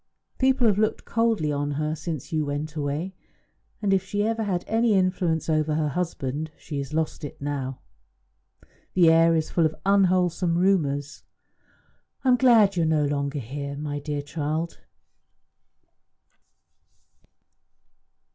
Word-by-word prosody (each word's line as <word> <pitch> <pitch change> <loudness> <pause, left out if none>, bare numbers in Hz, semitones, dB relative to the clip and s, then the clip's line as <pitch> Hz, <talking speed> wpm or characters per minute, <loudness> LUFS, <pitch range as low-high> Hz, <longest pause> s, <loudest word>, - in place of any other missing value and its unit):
People 260 -1 +3
have 210 -3 +3
looked 215 0 0
coldly 225 -10 +1
on 145 0 -1
her 150 +2 -1
since 160 -2 -5
you 155 -1 +1
went 145 +2 -4
away, 150 +5 -3 0.7
and 195 -1 +2
if 190 -1 +2
she 205 +2 -2
ever 225 0 -1
had 185 -5 -1
any 225 -1 +2
influence 180 -3 +1
over 155 -1 +1
her 155 -1 0
husband, 155 -2 -3
she 145 -3 -6
has 140 0 -5
lost 160 0 -2
it 145 - -7
now. 140 -2 -3 1.2
The 170 -3 +6
air 165 0 +5
is 160 -1 -1
full 170 - +2
of 155 - -8
unwholesome 180 -3 +2
rumours. 150 -6 +1 1.0
I 265 - +2
am 250 - +6
glad 235 -5 +6
that 195 - -12
you - - +3
are - - +2
no 155 -2 +2
longer 140 0 -2
here, 140 +3 -5
my 145 0 -4
dear 145 0 -4
child." 155 +3 -3
160 Hz, 145 wpm, -25 LUFS, 145-190 Hz, 1.2 s, The